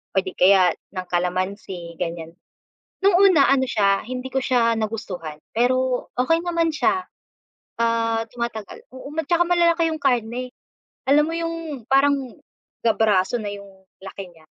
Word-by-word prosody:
o - - -2
di 185 - -5
kaya 185 -1 +5 0.2
ng 185 -1 -4
kalamansi 180 -1 -3
gan'yan. 165 -2 -4 0.7
No'ng 390 -3 +5
una 285 -5 +5
ano 275 -1 +3
siya 200 -3 +2
hindi 250 +3 -5
ko 265 -1 -1
siya 235 -3 +2
nagustuhan 185 -8 -5 0.2
pero 255 +1 +1
okey 330 +7 +2
naman 335 -1 0
siya, 365 +4 +1 0.8
ah, 230 -1 +1
tumatagal, 235 -3 -6
oo 260 +2 -9 0.2
tsaka 345 +1 +3
malalaki 340 -1 +3
yung 315 - -4
karne, 245 -1 0 0.6
alam 295 +2 +5
mo 325 - -3
yung 330 -5 -4
parang 275 +1 +4 0.7
ga 225 - +4
braso 210 0 +2
na 205 -2 -4
yung 200 0 -10 0.3
laki 190 -1 -9
nya. 160 -1 -21
230 Hz, 145 wpm, -22 LUFS, 195-280 Hz, 0.8 s, kaya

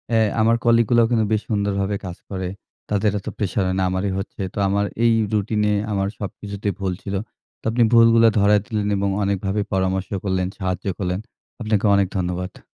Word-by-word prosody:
এ - - +5 0.2
আমার 115 +1 +4
কলিগগুলাও 115 0 +4
কিন্তু 110 -2 +3
বেশ 105 - +1
সুন্দরভাবে 100 -1 0
কাজ 90 -1 -6
করে। 95 -2 -3 0.4
তাদের 105 0 +2
এতো 95 - -6
প্রেশার 100 -1 0
হয় 95 - 0
না, - - +2
আমারই 95 +2 -1
হচ্ছে। 100 +1 -7
তো - - -11
আমার 100 +1 +1 0.2
এই 115 - +5 0.2
রুটিনে 105 0 +1 0.2
আমার 100 -1 0
সবকিছুতেই 100 0 -4
ভুল 95 -2 -1
ছিল। 100 0 -3 0.4
তো - - -68
আপনি 120 +1 +3
ভুলগুলো 115 0 +6
ধরায় 100 0 +4
দিলেন 105 -3 -2
এবং 100 0 0
অনেকভাবে 100 +1 -1
পরামর্শ 95 0 0 0.2
করলেন, 95 -2 0
সাহায্য 95 -1 -3
করলেন। 90 -1 -2 0.4
আপনাকে 110 -2 +1
অনেক 100 -1 +3
ধন্যবাদ। 90 0 -3
100 Hz, 175 wpm, -22 LUFS, 95-110 Hz, 0.4 s, ভুলগুলো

